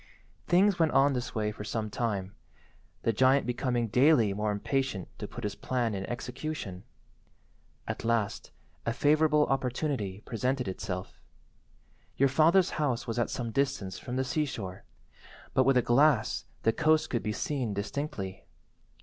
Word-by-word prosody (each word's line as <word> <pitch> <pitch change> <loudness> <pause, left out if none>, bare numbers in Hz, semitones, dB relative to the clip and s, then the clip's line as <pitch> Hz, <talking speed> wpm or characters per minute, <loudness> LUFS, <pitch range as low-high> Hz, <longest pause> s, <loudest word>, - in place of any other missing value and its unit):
"Things 185 +1 +4
went 160 -2 +3
on 135 +1 +5
this 125 0 -4
way 105 -1 0
for 105 - -8
some 110 0 -3
time, 100 -4 -2 0.7
the 115 - +2
giant 130 +5 +4
becoming 120 -1 0
daily 125 -3 +4
more 105 +1 -1
impatient 105 -1 -1
to 105 - -4
put 120 - -9
his 105 -1 -2
plan 120 +1 -1
in 95 -1 -4
execution. 120 -6 -5 1.0
At - - -4
last 115 -3 0 0.3
a 115 - -1
favourable 150 +2 +4
opportunity 125 -6 -2
presented 125 +2 -2
itself. 95 0 -5 1.0
Your 140 0 +4
father's 165 +7 +4
house 130 -6 0
was 115 0 -2
at 120 - +1
some 120 -2 -3
distance 130 -8 -1
from 125 - -5
the 130 - +1
sea–shore, 125 -9 -3 0.7
but 130 - +4
with 135 -1 +4
a 125 - +4
glass 125 -1 +3 0.2
the 115 - +3
coast 155 +2 +2
could 120 - 0
be 105 - -2
seen 120 -2 -2
distinctly. 100 -3 -4
125 Hz, 150 wpm, -29 LUFS, 105-140 Hz, 1.0 s, on